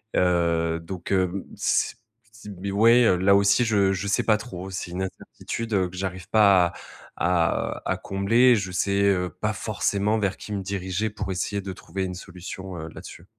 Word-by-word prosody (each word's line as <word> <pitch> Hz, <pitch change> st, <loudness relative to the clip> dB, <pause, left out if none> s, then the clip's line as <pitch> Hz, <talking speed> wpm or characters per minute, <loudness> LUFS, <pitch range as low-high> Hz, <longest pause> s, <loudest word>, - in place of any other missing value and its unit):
Heu, 85 Hz, -2 st, +2 dB
donc, 90 Hz, +3 st, -7 dB
heu, 95 Hz, -1 st, +3 dB
mmh, 95 Hz, +2 st, -5 dB
c -, -, +2 dB, 0.4 s
c 110 Hz, -1 st, -12 dB
mais, 100 Hz, 0 st, -3 dB
ouais, 115 Hz, +5 st, +5 dB
heu, 90 Hz, -, +4 dB
là 95 Hz, +2 st, +4 dB
aussi, 100 Hz, +4 st, +4 dB
je 100 Hz, -4 st, +3 dB
je 95 Hz, +2 st, -3 dB
sais 100 Hz, -, +1 dB
pas 110 Hz, -1 st, +3 dB
trop, 95 Hz, -5 st, -8 dB
c'est 90 Hz, -2 st, -5 dB
une 90 Hz, +2 st, -4 dB
incertitude 115 Hz, +4 st, -6 dB, 0.2 s
que 90 Hz, -, -12 dB
j'arrive 95 Hz, -2 st, -5 dB
pas 100 Hz, -5 st, +5 dB
à -, -, -9 dB, 0.5 s
à, 85 Hz, -1 st, +1 dB
heu, -, -, -24 dB
à -, -, 0 dB
combler. 110 Hz, +5 st, +3 dB
Je 100 Hz, -4 st, -3 dB
sais, 100 Hz, +2 st, +1 dB
heu, 95 Hz, -3 st, +2 dB
pas -, -, +1 dB
forcément 105 Hz, +2 st, 0 dB
vers 100 Hz, -2 st, -1 dB
qui 105 Hz, -, -7 dB
me 100 Hz, -, -2 dB
diriger 95 Hz, +2 st, -2 dB
pour 105 Hz, -2 st, -5 dB
essayer 100 Hz, +3 st, -2 dB
de 95 Hz, -1 st, -6 dB
trouver 95 Hz, +1 st, -5 dB
une 90 Hz, -1 st, -5 dB
solution, 90 Hz, 0 st, -8 dB
heu, 80 Hz, -, -6 dB
là-dessus. -, -, -11 dB
95 Hz, 195 wpm, -25 LUFS, 90-100 Hz, 0.5 s, ouais